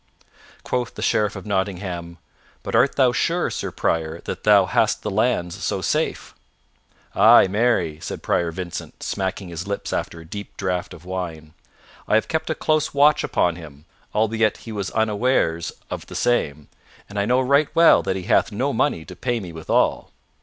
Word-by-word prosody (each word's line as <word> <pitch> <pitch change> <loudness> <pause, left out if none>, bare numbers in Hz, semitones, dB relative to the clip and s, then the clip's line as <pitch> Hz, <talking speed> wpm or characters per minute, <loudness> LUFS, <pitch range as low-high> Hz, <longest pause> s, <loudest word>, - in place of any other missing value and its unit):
Quoth 125 -2 -2
the - - -5
Sheriff 105 0 +1
of - - -8
Nottingham, 95 -4 -3 0.5
"But - - -5
art 140 - +4
thou 130 -3 +4
sure, 120 - 0
Sir - - -3
Prior, 80 0 -1
that - - -6
thou - - +6
hast - - +1
the - - -2
lands 85 0 0
so - - -1
safe?" - - -1 0.8
"Ay, - - +7
marry," 95 -7 +1
said - - -6
Prior 85 -1 0
Vincent, 90 0 -7
smacking 95 -1 -3
his 85 +3 -6
lips 100 0 -4
after 85 - -3
a 80 - -12
deep 100 +5 -8
draught 90 -2 -2
of 85 0 -15
wine, 85 -4 -5 0.5
"I - - +3
have 110 - +2
kept 160 0 -2
a 160 - 0
close 155 -2 0
watch 150 +1 +5
upon 85 -1 +1
him, 75 -3 -12 0.3
albeit 110 0 +2
he 115 - -7
was 100 -3 -3
unawares 110 -6 +1 0.2
of - - -5
the - - -9
same, 75 -12 0 0.4
and 105 0 -5
I 100 - 0
know 125 +2 +3
right 140 +3 +3
well 165 0 +7
that 95 - -2
he 95 - -4
hath 115 +4 +2
no 130 +7 -1
money 80 -7 0
to 90 - -10
pay 120 +5 -1
me 90 -5 -8
withal." 80 -1 0
100 Hz, 180 wpm, -22 LUFS, 85-120 Hz, 0.8 s, Ay